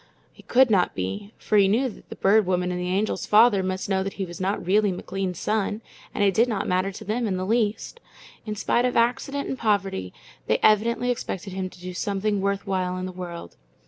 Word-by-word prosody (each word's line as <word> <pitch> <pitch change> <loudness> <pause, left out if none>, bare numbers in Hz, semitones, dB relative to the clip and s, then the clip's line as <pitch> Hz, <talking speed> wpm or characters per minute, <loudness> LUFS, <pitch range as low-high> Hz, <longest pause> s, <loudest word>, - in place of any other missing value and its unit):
It - - -18
could 255 -1 +5
not 185 -4 +2
be, 95 - -4
for 210 - +2
he 195 - +5
knew 235 +7 +2
that 225 - -11
the - - -7
Bird 205 0 +3
Woman 180 -1 0
and 180 0 -3
the 180 - -2
Angel's 200 +4 -1
father 215 -1 +6
must 185 0 -3
know 190 -1 +1
that 195 +1 -3
he 195 - -3
was 175 0 -9
not 190 -1 -1
really 205 +2 +3
McLean's 185 0 -4
son, 215 +2 -1 0.3
and - - -1
it 195 -1 +3
did 230 +6 +4
not 210 -4 -2
matter 185 +2 +1
to 215 +3 -10
them 225 +3 -1
in 190 -3 -1
the 185 - -2
least. 220 - -1 0.4
In 215 -1 -4
spite 240 +4 +1
of 250 - 0
accident 260 +4 0
and 265 - -4
poverty, 195 - 0 0.4
they 110 - +3
evidently 235 +3 +3
expected 195 -5 -5
him 190 0 -3
to 185 - -17
do 180 +1 -7
something 200 +2 -1
worth 200 +1 -1
while 185 -2 -1
in 185 - -4
the 185 - -5
world. 175 -2 -8
195 Hz, 225 wpm, -25 LUFS, 185-215 Hz, 0.4 s, father